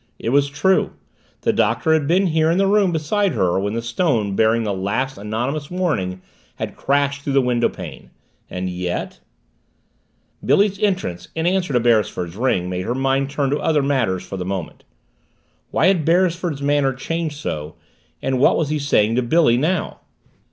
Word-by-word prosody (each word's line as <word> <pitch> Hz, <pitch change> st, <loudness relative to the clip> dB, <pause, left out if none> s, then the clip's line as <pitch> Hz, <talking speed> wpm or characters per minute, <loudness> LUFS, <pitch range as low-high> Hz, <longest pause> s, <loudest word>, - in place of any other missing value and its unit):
It -, -, -3 dB
was 140 Hz, +2 st, +3 dB
true 150 Hz, +7 st, +1 dB, 0.5 s
the -, -, +1 dB
Doctor 160 Hz, -, +2 dB
had 155 Hz, -3 st, +1 dB
been 185 Hz, +5 st, +3 dB
here 160 Hz, -2 st, +2 dB
in 170 Hz, -, +2 dB
the 195 Hz, -, +3 dB
room 200 Hz, -2 st, +3 dB
beside 175 Hz, +4 st, 0 dB
her 95 Hz, -5 st, +1 dB
when 100 Hz, +2 st, -2 dB
the 115 Hz, -, -3 dB
stone 115 Hz, -, 0 dB
bearing 110 Hz, +2 st, +3 dB
the 105 Hz, -2 st, -1 dB
last 105 Hz, +8 st, -2 dB
anonymous 125 Hz, +8 st, -3 dB
warning 130 Hz, -, -2 dB, 0.3 s
had -, -, -5 dB
crashed 140 Hz, 0 st, 0 dB
through 140 Hz, -1 st, -3 dB
the 135 Hz, -, +5 dB
windowpane. 125 Hz, -2 st, -2 dB, 0.4 s
And 90 Hz, 0 st, -4 dB
yet 90 Hz, -1 st, -4 dB, 1.2 s
Billy's 200 Hz, -1 st, +2 dB
entrance 185 Hz, -, -1 dB
in 160 Hz, 0 st, -1 dB
answer 180 Hz, -2 st, +1 dB
to 125 Hz, -, +4 dB
Beresford's 105 Hz, -7 st, +1 dB
ring 100 Hz, -6 st, 0 dB
made 90 Hz, 0 st, -3 dB
her 120 Hz, -, -1 dB
mind 135 Hz, +1 st, 0 dB
turn 140 Hz, -1 st, -1 dB
to 145 Hz, -, 0 dB
other 150 Hz, -3 st, +1 dB
matters 125 Hz, -10 st, 0 dB
for 95 Hz, -, -6 dB
the 90 Hz, -, -3 dB
moment. 95 Hz, -2 st, -5 dB, 0.9 s
Why -, -, +1 dB
had 185 Hz, -4 st, +3 dB
Beresford's 170 Hz, -3 st, +1 dB
manner 145 Hz, -1 st, +2 dB
changed 155 Hz, +3 st, -3 dB
so, 75 Hz, -, -5 dB, 0.5 s
and 130 Hz, -1 st, 0 dB
what -, -, +4 dB
was 155 Hz, -3 st, 0 dB
he 150 Hz, 0 st, -1 dB
saying 115 Hz, -5 st, +2 dB
to -, -, +3 dB
Billy 125 Hz, 0 st, +3 dB
now? 160 Hz, +7 st, -1 dB
140 Hz, 175 wpm, -20 LUFS, 110-160 Hz, 1.2 s, the